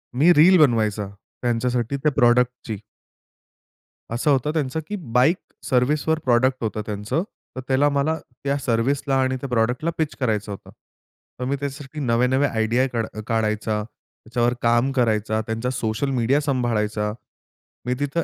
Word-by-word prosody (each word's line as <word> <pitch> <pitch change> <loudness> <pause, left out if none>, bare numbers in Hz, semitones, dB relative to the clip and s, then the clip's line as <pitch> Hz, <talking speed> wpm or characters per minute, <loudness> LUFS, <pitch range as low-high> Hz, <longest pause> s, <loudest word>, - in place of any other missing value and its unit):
मी 160 +7 +5
reel 175 +4 +7
बनवायचा 110 - +2 0.3
त्यांच्यासाठी 120 +1 0
त्या 150 +2 +1
प्रॉडक्टची. 120 -3 +2 1.4
असं 135 +5 +1
होतं 140 +2 +2
त्यांचं, 150 -1 -1
की 210 - -3 0.2
बाईक 130 +9 +4 0.3
सर्व्हिसवर 150 +5 +2
प्रॉडक्ट 130 +1 +2
होतं 110 -1 -2
त्यांचं. 105 - -2 0.3
तर 130 - -4
त्याला 135 +2 +3
मला 145 +3 +1 0.3
त्या 140 0 0
सर्व्हिसला 135 +4 +1
आणि 130 0 +1
त्या 140 - -5
प्रॉडक्टला 125 +6 +1
पिच 160 -2 -1
करायचं 110 -5 -1
होतं. 100 - -9 0.7
तर 125 - -2
मी 140 - 0
त्याच्यासाठी 140 +1 -6
नवे-नवे 125 +4 +2
आयडिया 115 +3 +1
काढा 110 -2 -3
काढायचा, 110 -1 0
त्याच्यावर 120 +2 -3
काम 120 +3 +3
करायचा, 110 -4 +1
त्यांचा 115 +2 -3
सोशल 120 +2 -2
मीडिया 130 +2 +2
सांभाळायचा. 110 -6 -1 0.7
मी 125 - 0
तिथं 145 +4 -1
125 Hz, 140 wpm, -23 LUFS, 115-140 Hz, 1.4 s, reel